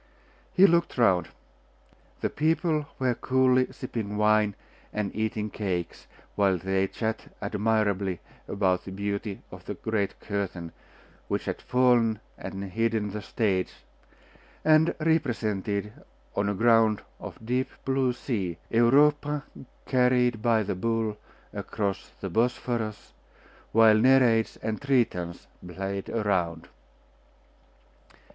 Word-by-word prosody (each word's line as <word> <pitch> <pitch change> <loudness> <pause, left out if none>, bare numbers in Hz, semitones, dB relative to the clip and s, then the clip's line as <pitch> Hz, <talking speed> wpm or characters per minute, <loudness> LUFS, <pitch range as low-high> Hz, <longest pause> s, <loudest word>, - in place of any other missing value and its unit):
He 190 - +6
looked 170 -5 +2
round. 95 -8 +3 0.9
The - - -1
people 155 -1 +1
were 130 -2 +1
coolly 130 +1 +2
sipping 115 -6 -5
wine 105 -1 +3 0.4
and 105 -2 -3
eating 110 -1 -2
cakes, 90 -5 -4 0.3
while 100 -2 +2
they 95 +2 0
chatted 110 +2 -4
admirably 100 -4 0 0.3
about 95 -2 +1
the 95 - -7
beauty 100 +1 -4
of - - -11
the - - -5
great 110 -3 -2
curtain, 95 -5 -4 0.6
which - - -2
had - - -3
fallen 120 -4 +3 0.2
and 95 0 -6
hidden 110 +1 -1
the 105 +1 -5
stage, 100 -3 -1 0.9
and 155 +1 +5
represented, 110 - 0 0.4
on 100 0 +1
a 100 - -1
ground 115 0 +4 0.2
of - - -8
deep 130 +3 0 0.2
blue 135 -1 +2
sea, 105 -9 -3
Europa 145 +5 +3 0.4
carried 125 -3 +2
by 115 -1 +3
the 100 - -2
bull 110 +2 -1 0.4
across 100 -2 -3
the 95 - -3
Bosphorus, 115 0 -1 0.6
while 110 -1 +6
Nereids 120 -2 +4
and 110 -1 -2
Tritons 115 -11 0 0.2
played 95 +2 -5
around. 90 -7 -1
110 Hz, 110 wpm, -27 LUFS, 100-125 Hz, 0.9 s, He